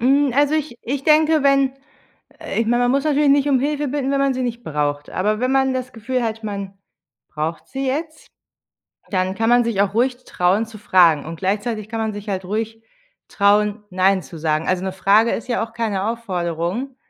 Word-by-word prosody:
Hm, 275 Hz, +2 st, +3 dB
also 290 Hz, +2 st, +3 dB
ich 300 Hz, -6 st, -2 dB
ich 270 Hz, +3 st, -3 dB
denke, 310 Hz, -1 st, +4 dB
wenn 275 Hz, -1 st, +3 dB, 0.7 s
äh, -, -, -3 dB
ich 230 Hz, -, 0 dB
mein, 240 Hz, +2 st, +2 dB
man 245 Hz, -, +2 dB
muss 275 Hz, +1 st, +1 dB
natürlich 295 Hz, -1 st, +3 dB
nicht 285 Hz, 0 st, +3 dB
um 265 Hz, -3 st, +3 dB
Hilfe 295 Hz, +1 st, -1 dB
bitten, 275 Hz, 0 st, -2 dB
wenn 275 Hz, -, +1 dB
man 275 Hz, -1 st, +2 dB
sie 255 Hz, -, -2 dB
nicht 240 Hz, -1 st, -3 dB
braucht. 145 Hz, -1 st, -2 dB
Aber 210 Hz, +4 st, 0 dB
wenn 255 Hz, +1 st, +1 dB
man 265 Hz, -1 st, +2 dB
das 255 Hz, 0 st, -4 dB
Gefühl 250 Hz, +2 st, -2 dB
hat, 225 Hz, -1 st, -3 dB
man 200 Hz, -2 st, -5 dB, 0.5 s
braucht 155 Hz, +2 st, -4 dB
sie 270 Hz, 0 st, -4 dB
jetzt, 310 Hz, +4 st, -4 dB, 0.8 s
dann 185 Hz, 0 st, 0 dB
kann 225 Hz, +2 st, 0 dB
man 245 Hz, 0 st, +5 dB
sich 225 Hz, -4 st, 0 dB
auch 200 Hz, 0 st, 0 dB
ruhig 245 Hz, +2 st, +1 dB
trauen 185 Hz, +5 st, +1 dB
zu 220 Hz, -1 st, -12 dB
fragen. 175 Hz, -7 st, +4 dB
Und 165 Hz, +1 st, -7 dB
gleichzeitig 210 Hz, +3 st, -2 dB
kann 225 Hz, 0 st, -4 dB
man 220 Hz, -1 st, -2 dB
sich 205 Hz, +1 st, -7 dB
halt 190 Hz, -1 st, -3 dB
ruhig 225 Hz, +3 st, -3 dB, 0.5 s
trauen, 210 Hz, +1 st, +2 dB
nein 190 Hz, +1 st, +2 dB
zu 165 Hz, -, -11 dB
sagen. 155 Hz, 0 st, -1 dB
Also 185 Hz, 0 st, 0 dB
'ne 190 Hz, -, -2 dB
Frage 200 Hz, +4 st, +3 dB
ist 230 Hz, -, -4 dB
ja 240 Hz, -2 st, 0 dB
auch 225 Hz, -, -18 dB
keine 210 Hz, -4 st, -2 dB
Aufforderung. 190 Hz, +2 st, -3 dB
225 Hz, 205 wpm, -20 LUFS, 195-265 Hz, 0.8 s, man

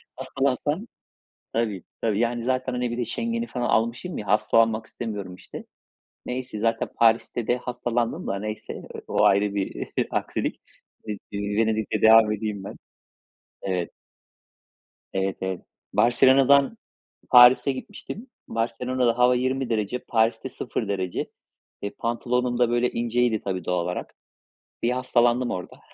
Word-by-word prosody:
hastalansan 145 Hz, -, -1 dB, 0.7 s
Tabii, 110 Hz, -5 st, -1 dB, 0.2 s
tabii. 110 Hz, -2 st, +1 dB
Yani, 120 Hz, 0 st, 0 dB
zaten, 130 Hz, +1 st, -1 dB
hani, 125 Hz, -1 st, -1 dB
bir 120 Hz, -, -3 dB
de 120 Hz, -, -1 dB
Schengen'i 230 Hz, -, -2 dB
falan 125 Hz, -, -3 dB
almışım 115 Hz, +11 st, 0 dB
ya 105 Hz, -, -6 dB
hastalanmak 110 Hz, +2 st, +3 dB
istemiyorum, 105 Hz, -6 st, -6 dB
işte. -, -, -10 dB, 0.6 s
Neyse, 125 Hz, -3 st, -4 dB
zaten 115 Hz, +1 st, 0 dB
Paris'te 115 Hz, 0 st, +2 dB
de 120 Hz, -, +2 dB
hastalandım 120 Hz, -1 st, -2 dB
da 100 Hz, -, -1 dB
neyse, 105 Hz, +1 st, -5 dB
eee, -, -, -9 dB
o -, -, +2 dB
ayrı 100 Hz, +1 st, +3 dB
bir 100 Hz, -1 st, -3 dB, 0.2 s
aksilik. -, -, -2 dB, 0.5 s
Iıı, 105 Hz, -1 st, -3 dB, 0.2 s
ııı, 100 Hz, 0 st, -2 dB
Venedik'le 110 Hz, 0 st, 0 dB
devam 110 Hz, -1 st, +7 dB
edeyim 105 Hz, -2 st, -3 dB
ben. -, -, -7 dB, 0.9 s
Evet. 90 Hz, -3 st, -2 dB, 1.2 s
Evet, 95 Hz, 0 st, -1 dB
evet. 95 Hz, -1 st, -3 dB, 0.3 s
Barcelona'dan 135 Hz, -, +5 dB, 0.5 s
Paris'e 125 Hz, +2 st, +8 dB
gitmiştim. 205 Hz, -, -8 dB, 0.2 s
Barcelona'da 120 Hz, +1 st, 0 dB
hava 125 Hz, 0 st, +5 dB
20 130 Hz, +1 st, -1 dB
derece, 110 Hz, +1 st, -1 dB
Paris'te 115 Hz, +2 st, 0 dB
0 115 Hz, -3 st, -4 dB
derece. 95 Hz, -3 st, -2 dB, 0.5 s
Eee, 100 Hz, -, -2 dB
pantolonum 120 Hz, +1 st, -1 dB
da 120 Hz, -1 st, +4 dB
böyle 120 Hz, +1 st, +1 dB
inceydi, 120 Hz, -1 st, +1 dB
tabii, 95 Hz, -2 st, -3 dB
doğal 90 Hz, -1 st, 0 dB
olarak. 90 Hz, +1 st, -5 dB, 0.7 s
Bir 120 Hz, -, +2 dB
hastalandım 125 Hz, -1 st, +2 dB
orada. 90 Hz, -, -6 dB
115 Hz, 130 wpm, -25 LUFS, 105-125 Hz, 1.2 s, Paris'e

